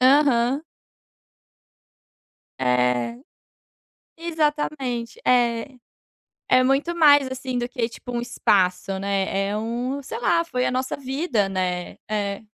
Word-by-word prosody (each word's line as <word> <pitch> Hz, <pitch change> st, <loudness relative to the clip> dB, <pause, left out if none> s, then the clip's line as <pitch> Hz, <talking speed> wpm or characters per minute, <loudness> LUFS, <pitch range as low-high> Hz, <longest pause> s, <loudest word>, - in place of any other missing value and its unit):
Aham. 265 Hz, 0 st, +4 dB, 2.0 s
É. 125 Hz, -, +1 dB, 1.0 s
Exatamente, 295 Hz, -7 st, -2 dB
é. 245 Hz, +1 st, +2 dB, 0.7 s
É 255 Hz, 0 st, +5 dB
muito 275 Hz, +6 st, +1 dB
mais, 290 Hz, -4 st, +6 dB
assim, 260 Hz, -1 st, -4 dB
do 240 Hz, 0 st, -1 dB
que, 245 Hz, -2 st, -2 dB
tipo, 245 Hz, +2 st, -9 dB
um 240 Hz, -1 st, -2 dB
espaço, 195 Hz, -5 st, +1 dB
né, 195 Hz, 0 st, 0 dB
é 205 Hz, +1 st, -2 dB
um 245 Hz, +5 st, -3 dB
sei 255 Hz, -, -6 dB
lá, 335 Hz, +8 st, +2 dB
foi 250 Hz, -5 st, -1 dB
a -, -, +1 dB
nossa 255 Hz, +1 st, -1 dB
vida, 265 Hz, -, -1 dB
né. 180 Hz, -2 st, -2 dB, 0.2 s
É. 205 Hz, -1 st, -2 dB
245 Hz, 115 wpm, -23 LUFS, 200-275 Hz, 2.0 s, mais